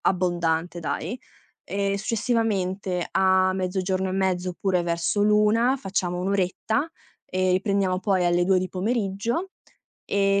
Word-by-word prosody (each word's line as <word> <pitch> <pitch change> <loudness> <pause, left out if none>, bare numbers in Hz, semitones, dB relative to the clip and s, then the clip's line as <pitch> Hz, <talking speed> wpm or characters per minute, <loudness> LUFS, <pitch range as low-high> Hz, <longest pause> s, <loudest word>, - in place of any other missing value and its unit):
Abbondante 175 -2 0
dai. 170 +6 -3 0.5
Ehm, 200 0 -1
successivamente 200 -4 -1
a 185 0 +3
mezzogiorno 185 0 -1
e - - -3
mezzo 185 -1 0
oppure 180 0 0
verso 170 +4 0
l'1, 210 +4 +4
facciamo 185 -6 -2
1 185 +2 -1
oretta 200 - 0 0.3
e 185 0 0
riprendiamo 190 -1 +1
poi 190 -2 +1
alle 175 0 +3
2 190 +1 +3
di 185 - -2
pomeriggio, 220 - -2 0.5
e 195 0 +2
190 Hz, 125 wpm, -25 LUFS, 180-200 Hz, 0.5 s, l'1